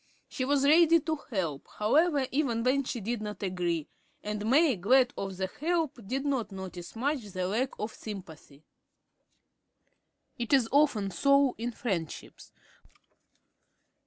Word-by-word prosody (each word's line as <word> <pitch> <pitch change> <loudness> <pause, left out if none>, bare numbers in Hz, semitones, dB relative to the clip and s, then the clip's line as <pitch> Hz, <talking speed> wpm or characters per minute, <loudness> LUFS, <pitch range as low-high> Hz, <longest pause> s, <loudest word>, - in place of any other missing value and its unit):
She 255 - -3
was 280 0 +2
ready 330 +2 +6
to 315 +1 -2
help, 170 - -3
however, 285 +6 +3
even 255 -5 0
when 270 +3 +2
she 250 -1 -4
did 230 +2 -3
not 210 -1 -6
agree; 175 -4 -1 0.4
and 210 +1 -3
May, 285 0 +5
glad 245 +7 +3
of 195 -1 -5
the 190 - -1
help, 325 -4 0
did 270 +5 -2
not 260 -7 -1
notice 185 -2 -8
much 270 +2 -1
the 185 -2 -3
lack 235 +7 0
of 215 +1 -4
sympathy. 160 -8 -10 1.8
It 235 +3 -2
is 260 -4 +4
often 270 -9 +3
so 275 +8 +3
in 240 +1 -2
friendships. 190 -10 -5
235 Hz, 135 wpm, -29 LUFS, 195-275 Hz, 1.8 s, ready